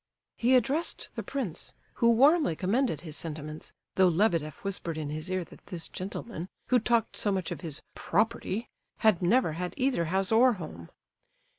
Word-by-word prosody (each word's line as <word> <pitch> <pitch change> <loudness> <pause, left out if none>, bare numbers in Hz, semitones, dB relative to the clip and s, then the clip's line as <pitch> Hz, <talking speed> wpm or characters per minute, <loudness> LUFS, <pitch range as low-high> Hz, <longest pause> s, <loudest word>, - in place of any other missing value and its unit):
He 250 +2 +3
addressed 275 +7 +1
the - - -4
prince, 245 - -4 0.3
who 235 - +6
warmly 275 - +5
commended 195 - 0
his 155 -4 -5
sentiments, 155 -1 -6 0.2
though 190 -1 +5
Lebedeff 165 -4 +1
whispered 175 -5 -3
in 150 -2 -3
his 155 +4 -4
ear 185 -1 0
that - - -16
this 170 -4 -3
gentleman, 185 -1 -6 0.2
who 250 - +5
talked 235 0 +1
so 205 - +1
much 190 -3 -1
of - - -5
his 160 -5 -4
"property," 225 +2 0 0.4
had 210 -5 +5
never 185 +1 +3
had 180 +3 -4
either 255 -10 +1
house 190 +4 0
or 245 +3 +6
home. 155 - -8
190 Hz, 165 wpm, -29 LUFS, 165-235 Hz, 0.4 s, who